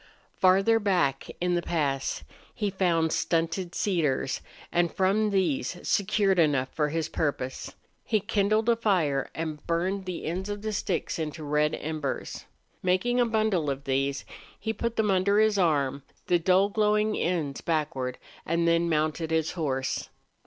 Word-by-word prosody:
Farther 195 +5 +4
back 175 -10 +1
in 180 0 +1
the 175 - +1
pass 145 -6 -1 0.3
he 205 -2 -1
found 170 -4 +1
stunted 165 +3 0
dead - - -14
cedars, 150 -9 0 0.3
and 175 -1 +2
from 200 +3 +2
these 180 -6 0
secured 200 -2 +2
enough 140 -5 +2
for 150 -1 -1
his 160 0 -1
purpose. 140 -5 -3 0.3
He 215 - +1
kindled 215 +1 +1
a 235 - +5
fire 175 -12 +1
and 155 -2 -4
burned 185 +4 -1
the 180 -2 -5
ends 185 +5 -3
of 205 0 -5
the 215 0 -2
sticks 185 -4 -2
into 155 0 -4
red 150 +1 +1
embers. 155 -3 -4 0.4
Making 185 +7 +1
a 240 - +4
bundle 215 -9 +1
of 140 0 -3
these, 135 +1 -1 0.3
he 220 0 -2
put 235 0 -3
them 215 -2 +2
under 195 +2 +3
his 215 -1 +3
arm, 140 -6 +1 0.2
the 175 - +3
dull, 185 +3 +3
glowing 210 0 +2
ends 160 -6 -1
backward, 150 -6 -1 0.3
and 170 +1 0
then 170 0 +3
mounted 155 +1 0
his 160 -1 +1
horse. 135 -6 -2
170 Hz, 155 wpm, -27 LUFS, 150-200 Hz, 0.4 s, a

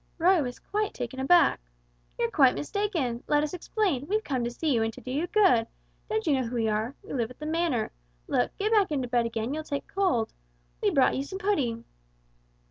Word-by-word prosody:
Roy 350 +1 +4
was 245 -3 -4
quite 420 0 -2
taken 250 +1 -5
aback. 340 +6 +4 0.6
"You're 235 0 0
quite 260 +1 +5
mistaken 305 - -2
let 295 0 +3
us 305 - -3
explain 355 - -1
we've 430 +3 0
come 260 - -1
to 235 - -1
see 295 +4 -1
you 230 - +2
and 225 0 0
do 255 - -8
you 300 +6 -1
good. 370 - +4 0.4
Don't 440 -1 -1
you 310 - +3
know 260 -3 0
who 240 - -5
we 225 -2 +1
are? 220 +5 -1
We - - -8
live 235 -4 -1
at 250 - -13
the 305 - -7
Manor. 315 -8 0 0.3
Look 125 - 0
get 420 +2 0
back 410 -6 +4
into 265 -4 -1
bed 240 -1 +1
again, 230 +3 -3
you'll 310 +1 -3
take 285 -2 -4
cold. 360 - 0 0.5
We've - - +1
brought 270 - +4
you 265 - -1
some 380 +7 -6
pudding." 275 - -1
280 Hz, 215 wpm, -27 LUFS, 240-360 Hz, 0.6 s, quite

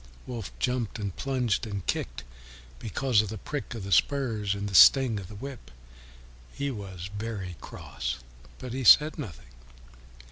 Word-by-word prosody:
Wolf 115 -6 -6
jumped 125 -4 -1
and 100 -4 -4
plunged 125 -5 -1
and 100 -3 -5
kicked - - -3 0.6
because 120 0 +2
of 110 - -5
the 110 - -5
prick 140 +3 -5
of 110 - -6
the 100 - -6
spurs 110 -5 +2
and 100 0 -3
the 100 - -6
sting 120 +3 +7
of 95 - -8
the 105 - -11
whip; 125 - -8 0.8
he 140 0 -3
was 95 -4 -7
very 100 -4 -5
cross, 65 +1 -5 0.4
but 125 -2 -7
he 130 +1 -3
said 150 +6 +7
nothing. 75 - -8
110 Hz, 155 wpm, -28 LUFS, 100-130 Hz, 0.8 s, sting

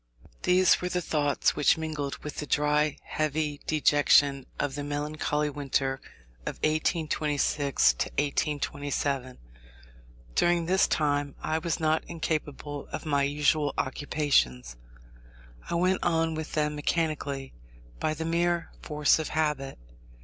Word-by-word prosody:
These 180 0 +4
were 180 - -2
the 180 - 0
thoughts 150 -4 +1
which 145 +1 +4
mingled 155 -3 -3
with 150 - -6
the 150 - -4
dry, 150 +1 +2
heavy 155 -1 -2
dejection 145 -2 +4
of 145 -2 -1
the 145 +1 -4
melancholy 150 0 -1
winter 135 -1 -1 0.4
of - - -4
1826 150 - +1 1.0
7. 130 -3 -2 1.0
During 175 - +2
this 190 +3 +3
time 145 -2 0
I 155 +1 0
was 165 0 -2
not 155 0 +1
incapable 150 -3 -4
of - - -5
my 145 -2 +1
usual 145 +1 +1
occupations. 130 - 0 0.9
I - - -1
went 185 +2 +2
on 165 -1 +1
with 160 0 -5
them 150 -1 +1
mechanically, 145 -3 -2 0.5
by 155 - 0
the 160 +1 -4
mere 170 +1 0
force 150 0 +2
of 160 - -2
habit. 150 -4 -1
150 Hz, 120 wpm, -28 LUFS, 145-160 Hz, 1.0 s, These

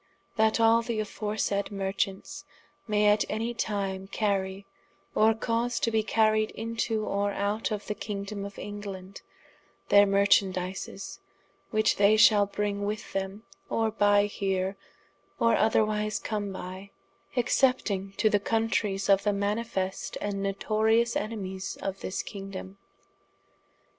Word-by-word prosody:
] - - -36
_That 220 +1 +3
all 230 0 +5
the 235 -1 -3
aforesaide 210 -1 -2
Marchants 195 -1 -3 0.4
may 210 -1 +2
at 210 0 +5
any 225 +2 -2
time 195 -4 -2
carrie, 195 -1 -1 0.5
or 220 +1 +4
cause 230 +1 -1
to 230 - 0
bee 220 -1 +2
carried 215 0 +2
into 225 -1 -2
or 200 0 0
out 205 +3 -1
of 210 -2 -4
the - - -2
kingdome 200 -1 -5
of 200 0 -8
England, 200 -2 -7 0.7
their 205 0 +7
marchandizes, 195 -1 +1 0.5
which 215 0 +2
they 205 +2 +5
shall 205 -2 +6
bring 205 0 -2
with 210 +1 -4
them, 195 +2 -3 0.3
or 225 -1 +1
buy 205 -1 +4
here 195 -1 -1 0.6
or 230 - +4
otherwise 215 -1 +2
come 205 -3 -3
by, 185 +1 -7 0.5
excepting 240 -6 +1
to 210 +2 +2
the 210 -1 +3
countreyes 210 -2 0
of 195 -1 +5
the 205 0 +1
manifest 200 -1 -2
and 200 -1 -3
notorious 220 +4 +1
enemies 195 -3 -4
of 195 0 -4
this 185 - -3
kingdome. 195 -1 -8
205 Hz, 130 wpm, -28 LUFS, 195-220 Hz, 0.7 s, their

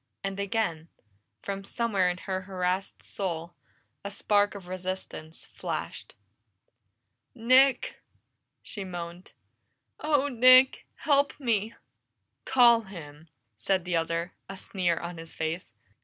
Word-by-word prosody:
And 195 0 -3
again, 200 -6 -1 0.6
from 195 0 -4
somewhere 200 -4 +1
in 180 - -2
her 190 0 -3
harassed 185 0 -2
soul, 170 -3 -4 0.5
a 200 - -4
spark 205 0 +1
of 195 -3 -9
resistance 185 -3 -6
flashed. - - -5 1.2
"Nick!" 255 +2 +4 0.6
she 200 - -6
moaned. 175 -1 -7 0.7
"Oh, 295 -2 +2
Nick! 255 0 +6
Help 285 -1 +2
me!" 225 -4 0 0.7
"Call 240 -3 +6
him!" 160 -6 -11 0.3
said 185 - 0
the 180 -1 -1
other, 165 +1 -1 0.2
a 195 - -7
sneer 185 -5 -1
on 170 0 -6
his 165 0 -11
face. 160 -3 -3
190 Hz, 110 wpm, -28 LUFS, 175-230 Hz, 1.2 s, Nick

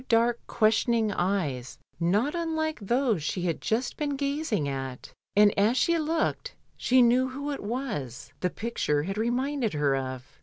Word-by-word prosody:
155 230 0 +5
dark, 240 -1 -4
questioning 220 0 +2
eyes 160 -11 -1 0.2
not 205 - +1
unlike 320 -2 -1
those 235 - +1
she 175 +4 -2
had 170 -3 -1
just 235 +3 -1
been 290 -2 -1
gazing 280 - -1
at, 135 -2 -5 0.2
and 205 0 +6
as 220 +5 +3
she 340 +6 +3
looked* 325 +10 -1 0.2
she 255 0 +4
knew 250 +2 +3
who 285 +3 -4
it 280 - -4
was 205 - -4
the 180 - 0
picture 160 -10 -1
had 195 +4 -3
reminded 245 - 0
her 145 -2 +2
of. 130 -1 -6
225 Hz, 160 wpm, -27 LUFS, 170-270 Hz, 0.2 s, and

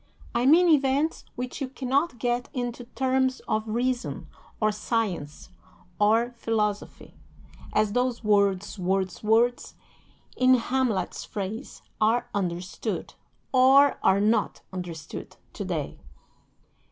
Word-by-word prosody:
I 240 +2 +2
mean 340 +5 +6
events 290 0 +2
which 250 +3 -5
you 275 - -1
cannot 270 +2 -1
get 240 +2 -1
into 245 -1 -3
terms 260 +1 0
of 215 +1 -1
reason, 245 +3 -2 0.3
or 215 -1 +2
science, 205 -8 -3 0.5
or 225 +3 +3
philosophy 215 -3 -3 0.6
as 215 -1 +2
those 245 -1 0
'words, 200 -1 +1
words, 185 0 -1
words,' 230 +3 +2 0.6
in 255 0 +5
Hamlet's 245 -6 -1
phrase, 215 +5 -6 0.2
are 225 +3 +2
understood 180 -2 -3 0.4
(or 270 +2 +6
are 190 - +4
not 215 +1 +1
understood) 175 -4 -7 0.2
to - - -5
day." - - -4
235 Hz, 110 wpm, -26 LUFS, 205-255 Hz, 0.6 s, mean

